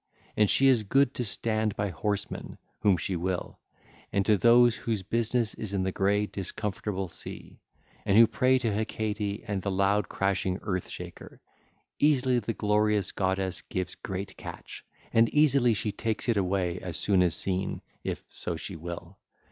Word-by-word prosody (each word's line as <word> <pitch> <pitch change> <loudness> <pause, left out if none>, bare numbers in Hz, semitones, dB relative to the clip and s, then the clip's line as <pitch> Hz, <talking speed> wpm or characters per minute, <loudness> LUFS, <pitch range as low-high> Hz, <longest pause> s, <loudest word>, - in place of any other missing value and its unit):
And 105 -2 +3
she 135 - +4
is 130 -4 +5
good 135 +5 +2
to 125 - -2
stand 110 +1 0
by 100 0 -1
horsemen, 100 +5 -3 0.2
whom 100 -3 +3
she 90 +3 -2
will: 90 +1 -3 0.5
and 100 -1 +1
to 105 - +5
those 120 +3 +6
whose 110 -4 -3
business 115 +2 +1
is 100 -2 -5
in 95 - 0
the 95 - 0
grey 100 +2 +1
discomfortable 95 0 -4
sea, - - -9 0.4
and 100 - +3
who 115 - +10
pray 130 +3 +2
to 115 -4 -1
Hecate 105 -1 -2
and 100 -3 -2
the 100 - -2
loud 100 +1 +1
crashing 95 -1 0
Earth 90 -3 -2
Shaker, - - -9 0.6
easily 130 -4 +3
the 115 0 -3
glorious 105 -2 +1
goddess 95 -1 -1
gives 95 -1 -4
great 95 +1 -6
catch, - - -9 0.3
and 115 0 +5
easily 140 -6 +4
she 105 +1 -1
takes 110 +3 -3
it 115 - +3
away 90 -2 0
as 90 -3 -3
soon 95 0 +3
as 90 -3 +3
seen, 95 0 -2 0.2
if - - -4
so 85 - -3
she 85 +4 -6
will. 85 +3 -8
100 Hz, 165 wpm, -28 LUFS, 95-115 Hz, 0.6 s, who